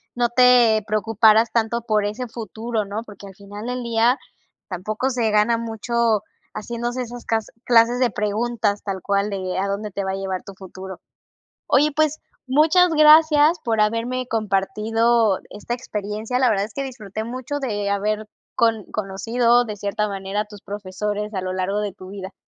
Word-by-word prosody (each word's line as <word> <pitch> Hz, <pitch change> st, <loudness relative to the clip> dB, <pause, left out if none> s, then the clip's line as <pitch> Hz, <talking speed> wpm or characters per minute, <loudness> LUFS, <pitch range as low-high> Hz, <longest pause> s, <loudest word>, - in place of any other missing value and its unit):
no 240 Hz, 0 st, +2 dB
te 240 Hz, -3 st, +5 dB
preocuparas 220 Hz, +1 st, +3 dB
tanto 230 Hz, 0 st, 0 dB
por 215 Hz, -2 st, +2 dB
ese 225 Hz, +5 st, -4 dB
futuro, 225 Hz, 0 st, -4 dB
¿no?, 210 Hz, +3 st, -5 dB
porque 205 Hz, -2 st, -12 dB
al 195 Hz, -, -13 dB
final 205 Hz, +2 st, -9 dB
del 250 Hz, 0 st, -3 dB
día 235 Hz, +2 st, +2 dB, 0.5 s
tampoco 215 Hz, +8 st, -2 dB
se 235 Hz, -3 st, 0 dB
gana 215 Hz, +2 st, +3 dB
mucho 230 Hz, -1 st, 0 dB, 0.3 s
haciéndose 240 Hz, +3 st, -3 dB
esas 240 Hz, 0 st, -9 dB
cas 225 Hz, -2 st, 0 dB, 0.2 s
clases 240 Hz, +1 st, +4 dB
de 250 Hz, -2 st, +3 dB
preguntas, 210 Hz, 0 st, -1 dB
tal 195 Hz, -2 st, -4 dB
cual 200 Hz, +1 st, 0 dB
de 185 Hz, -2 st, -3 dB
a 195 Hz, -, 0 dB
dónde 205 Hz, +1 st, -3 dB
te 200 Hz, +1 st, -3 dB
va 190 Hz, -, -2 dB
a -, -, -2 dB
llevar 190 Hz, -1 st, -3 dB
tu 195 Hz, -, -10 dB
futuro. 190 Hz, 0 st, -9 dB, 0.7 s
Oye, 295 Hz, +3 st, +4 dB
pues, 310 Hz, 0 st, +1 dB, 0.3 s
muchas 315 Hz, +7 st, +4 dB
gracias 310 Hz, +1 st, +6 dB
por 225 Hz, -2 st, +1 dB
haberme 235 Hz, +4 st, 0 dB
compartido 220 Hz, 0 st, +1 dB
esta 210 Hz, +3 st, -5 dB
experiencia, 215 Hz, 0 st, -3 dB
la 255 Hz, -, +4 dB
verdad 200 Hz, -2 st, +1 dB
es 215 Hz, -, -13 dB
que 275 Hz, -, -3 dB
disfruté 220 Hz, -5 st, -6 dB
mucho 255 Hz, +4 st, -4 dB
de 205 Hz, -6 st, -2 dB
haber 210 Hz, +2 st, -1 dB, 0.3 s
con 225 Hz, -3 st, +2 dB
conocido 230 Hz, +4 st, +1 dB
de 215 Hz, -2 st, -5 dB
cierta 210 Hz, +2 st, -1 dB
manera 195 Hz, +1 st, -3 dB
a 215 Hz, -, -4 dB
tus 210 Hz, -1 st, -13 dB
profesores 205 Hz, +1 st, -4 dB
a 190 Hz, -, -2 dB
lo 185 Hz, 0 st, -3 dB
largo 190 Hz, +2 st, -1 dB
de 210 Hz, -1 st, -2 dB
tu 185 Hz, 0 st, -12 dB
vida. 195 Hz, -1 st, -8 dB
220 Hz, 175 wpm, -22 LUFS, 200-240 Hz, 0.7 s, gracias